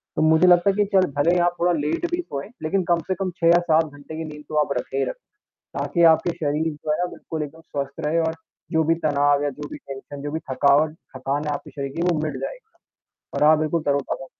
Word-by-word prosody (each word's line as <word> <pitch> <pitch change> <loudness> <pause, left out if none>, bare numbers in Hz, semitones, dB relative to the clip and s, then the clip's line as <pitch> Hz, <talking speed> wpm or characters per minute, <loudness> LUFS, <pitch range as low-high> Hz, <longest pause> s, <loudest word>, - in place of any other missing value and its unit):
तो - - 0
मुझे 160 +3 +5
लगता 175 +2 +6
है 195 - +1
कि 205 - +3
चल, 185 - +4
भले 165 +5 +3
ही - - +3
आप 175 - -1
थोड़ा 175 +1 +3
लेट 150 - -1
भी 345 - 0
सोएँ, 140 - -6
लेकिन 185 +4 +1
कम 170 - +4
से 185 - 0
कम 185 -1 -1
6 165 - +4
या 170 +1 +7
7 160 +1 +5
घंटे 150 +2 -9
की 160 - -3
नींद 150 0 -11
तो 155 - -5
आप 140 - -2
रखे 135 - -5
ही - - +2
रखें। - - -3 0.7
ताकि 170 - 0
आपके 175 - -2
शरीर 155 +1 0
जो 150 +1 -3
है, 180 - 0
बिल्कुल 160 -1 -6
एकदम 150 +2 -7
स्वस्थ 140 -2 -5
रहे 160 +3 +1
और 160 - -1 0.4
जो 160 0 +3
भी 165 +2 +3
तनाव 145 -1 +3
या 145 - 0
जो 145 - -5
भी - - -6
टेंशन, 140 0 -9
जो 145 - -4
भी 160 - -2
थकावट, 145 +3 +3 0.2
थकान 140 +3 -2
है 150 - -1
आपके - - -7
शरीर 140 -1 -5
की, 170 - -1
वो 155 - -1
मिट 155 - -2
जाएगा। - - -7 0.7
और - - 0
आप 155 - +5
बिल्कुल 155 +1 0
तरोताज़ा 140 +4 -1
155 Hz, 250 wpm, -23 LUFS, 145-170 Hz, 0.7 s, या